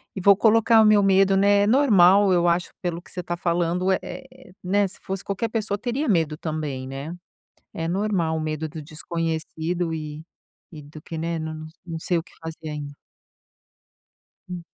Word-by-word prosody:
e 190 - -4
vou 200 +1 +6
colocar 225 0 +5
o - - +5
meu 210 -1 +5
medo, 195 0 +4
né 200 +1 +4
é - - +1
normal, 205 -6 +5
eu 175 -1 +3
acho 175 +1 +1
pelo 175 -2 -3
que - - -18
você 180 - -4
tá 175 0 -3
falando, 175 +2 0
é 190 - +2
é, 260 -1 -11
né, 200 +2 +2
se - - -14
fosse 190 0 -4
qualquer 200 +3 -2
pessoa 215 -2 -2
teria 245 +7 -2
medo 160 - +1
também, 150 -5 -4
né. 140 +5 -6 0.6
É 165 0 -3
normal 180 -3 0
o 160 - -2
medo 155 0 -3
do 155 +1 -8
desconhecido 165 +2 -3
e 155 -1 -6 0.5
e 155 -3 -10
do 150 +2 -12
que 165 - -8
né, 165 +1 -2
não 155 0 -6 0.2
não 165 -2 -5
sei 175 +1 0
o - - -3
que - - -21
fazer 160 -1 -7
ainda. 145 -1 -6 1.6
Hum. 175 -2 -6
175 Hz, 185 wpm, -24 LUFS, 160-200 Hz, 1.6 s, vou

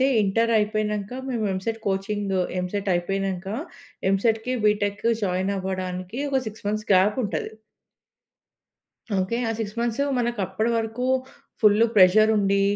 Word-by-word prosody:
అయితే - - +4 0.2
ఇంటర్ 225 +4 +1
అయిపోయినంక, 210 -1 -1 0.2
మేము 235 -4 -1
ఎంసెట్ 225 +4 -3
కోచింగ్, 195 0 -1 0.2
ఎంసెట్ 195 +2 -3
అయిపోయినంక 190 +1 -2 0.7
ఎంసెట్‌కి, 225 +4 +1
బీటెక్‌కి 205 +1 +1
జాయిన్ 185 +1 0
అవ్వడానికి 185 +3 -4
ఒక 265 -1 +2
6 215 0 -13
మంత్స్ 215 +1 -3
గ్యాప్ 195 +5 +4
ఉంటది. 205 - -3 1.6
ఓకే. 190 +5 0
ఆ - - 0
6 215 -1 -4
మంత్స్ 235 +2 -1 0.2
మనకప్పటి 220 -2 -1
వరకు 225 +2 -2 0.6
ఫుల్ 215 +1 +5
ప్రెషర్ 205 +3 +6
ఉండి 200 -1 +2
205 Hz, 120 wpm, -24 LUFS, 190-225 Hz, 1.6 s, ప్రెషర్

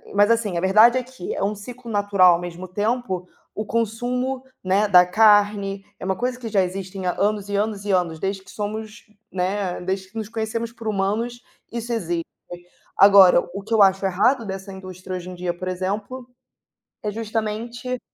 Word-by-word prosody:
mas, 205 +2 +5
assim, 215 -6 +1
a 170 - -1
verdade 215 +6 +6
é 255 - -1
que 255 -7 -7
é - - -4
um 210 +1 0
ciclo 235 +4 -10
natural 200 -3 +5
ao - - -3
mesmo 175 +1 -7
tempo, 205 -2 -2 0.3
o 215 - -3
consumo, 245 +4 -2 0.2
né, 195 +3 +2
da 180 -2 +7
carne, 205 -1 +3 0.2
é - - -6
uma 190 - 0
coisa 250 0 -2
que 235 - -6
já 200 -2 +3
existem, 185 +1 -5
há, 180 - +1
anos 205 0 0
e 200 - -2
anos 205 -1 -1
e 205 - 0
anos 175 -4 0
desde 195 +2 -3
que - - -14
somos, 215 +1 -5 0.3
né, 190 0 -2
desde 190 +1 -3
que 225 - -10
nos 220 - -3
conhecemos 230 0 -3
por 230 -2 -9
humanos, 215 +4 -1 0.3
isso 235 0 -4
existe. 175 -6 -2 0.7
Agora 195 -3 +8
o 200 - -5
que 225 - -5
eu 215 - +5
acho 195 0 +3
errado 230 +7 +2
dessa 195 0 -6
indústria 185 0 -8
hoje 180 +1 -8
em 180 - -8
dia 175 -1 -2
por 185 +1 -6
exemplo, 205 +7 -4 0.8
é 210 - -2
justamente 225 +3 -4
205 Hz, 190 wpm, -22 LUFS, 190-225 Hz, 0.8 s, Agora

